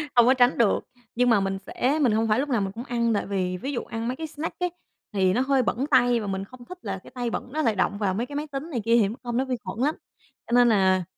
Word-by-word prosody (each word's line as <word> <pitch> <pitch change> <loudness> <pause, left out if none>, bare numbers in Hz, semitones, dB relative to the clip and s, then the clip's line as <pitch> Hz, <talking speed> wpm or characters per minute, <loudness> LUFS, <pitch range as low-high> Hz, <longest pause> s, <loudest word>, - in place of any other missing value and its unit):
không 240 -1 +7
có 260 - +6
tránh 250 0 +3
được. 230 -4 +3 0.4
Nhưng 245 0 +3
mà 220 -3 +5
mình 195 0 -1
sẽ 280 +5 0
mình 245 -5 +4
hông 225 +1 +1
phải 215 +3 +2
lúc 290 +1 -1
nào 235 -5 +1
mình 195 - -2
cũng 230 +5 -7
ăn, 235 -3 0
tại 205 - 0
vì 185 -2 -2
ví 270 +9 -4
dụ 250 - -3
ăn 230 +1 -5
mấy 255 - -1
cái 320 - -4
snack 310 +3 -6
ấy, 360 -1 0 0.4
thì 190 -2 +2
nó 250 - +2
hơi 265 -1 +2
bẩn 250 +3 -1
tay 245 -1 +4
và 210 - -5
mình 195 0 -2
không 245 +3 -14
thích 365 - -9
là 195 -3 -4
cái - - -14
tay 245 -1 -2
bẩn 245 - -4
nó 310 - 0
lại 225 -8 +1
động 200 +1 0
vào 200 -3 0
mấy 225 +6 -1
cái 285 +3 -9
máy 300 +1 -3
tính 285 +3 -6
này 240 -7 -2
kia 230 - +4
thì 195 - +2
mắc 230 - -8
công 240 -1 -2
nó 260 - +1
vi 260 -1 -1
khuẩn - - -6
lắm. 305 - +1 0.5
Cho - - -9
nên 245 -1 +6
là 190 -3 +3
235 Hz, 310 wpm, -25 LUFS, 205-260 Hz, 0.5 s, không